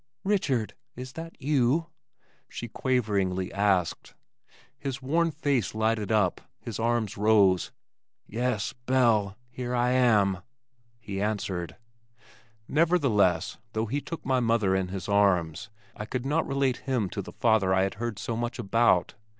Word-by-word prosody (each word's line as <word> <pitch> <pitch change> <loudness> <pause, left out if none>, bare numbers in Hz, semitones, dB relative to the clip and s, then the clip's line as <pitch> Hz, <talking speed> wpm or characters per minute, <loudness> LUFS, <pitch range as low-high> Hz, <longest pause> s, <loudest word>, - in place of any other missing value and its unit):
"Richard, 155 - 0 0.2
is 130 +1 -8
that 165 0 -8
you?" 145 +2 +2 0.6
she 120 - -6
quaveringly 100 -7 -1
asked. 95 -3 0 0.6
His 135 -1 -4
worn 165 +6 +1
face 140 - -1
lighted 110 -2 0
up. 105 -5 +2 0.2
His 115 -2 -6
arms 115 -2 0
rose. 100 -4 +3 0.5
"Yes, 115 -1 -2
Belle! 120 -6 +1
Here 125 0 -3
I 120 +1 +2
am," 105 -7 +3 0.6
he 100 -3 -5
answered. 100 -5 -2 0.9
Nevertheless 135 - +2
though 110 +1 0
he 140 +6 -2
took 165 - -7
my 130 -1 +2
mother 115 -5 +2
in 95 -1 0
his 95 -1 -6
arms, 100 -2 +2 0.3
I 105 - -6
could 125 +2 -3
not 155 +4 0
relate 135 -2 +1
him 125 -7 -1
to - - -3
the - - -10
father 110 -5 +2
I 95 0 +3
had 95 - -1
heard 120 -3 -3
so 115 +3 -3
much 120 +2 -3
about. 115 -4 +2
115 Hz, 140 wpm, -27 LUFS, 100-130 Hz, 0.9 s, rose